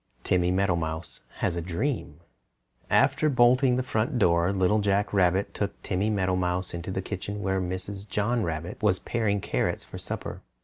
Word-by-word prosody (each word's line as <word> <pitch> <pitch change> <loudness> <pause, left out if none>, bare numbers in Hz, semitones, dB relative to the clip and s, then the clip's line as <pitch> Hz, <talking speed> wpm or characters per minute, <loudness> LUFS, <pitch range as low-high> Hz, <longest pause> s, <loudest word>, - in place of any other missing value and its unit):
TIMMY 90 -1 +2
MEADOWMOUSE 85 -4 -1 0.2
HAS 85 - +1
A - - -1
DREAM 85 - -3 0.7
After 155 - +3
bolting 125 0 +4
the 130 - 0
front 115 0 -1
door, 85 -3 +3
Little 100 +2 +2
Jack 100 0 +1
Rabbit 95 0 +2
took 100 -1 -3
Timmy 100 +2 0
Meadowmouse 95 -2 0
into 85 +2 -5
the 95 0 -2
kitchen 105 +1 -5
where 95 -1 0
Mrs. 95 +2 -5
John 115 +4 +1
Rabbit 85 +2 -4
was 105 -4 +3
paring 105 -3 -1
carrots - - -1
for - - -9
supper. - - -5
95 Hz, 160 wpm, -27 LUFS, 90-105 Hz, 0.7 s, bolting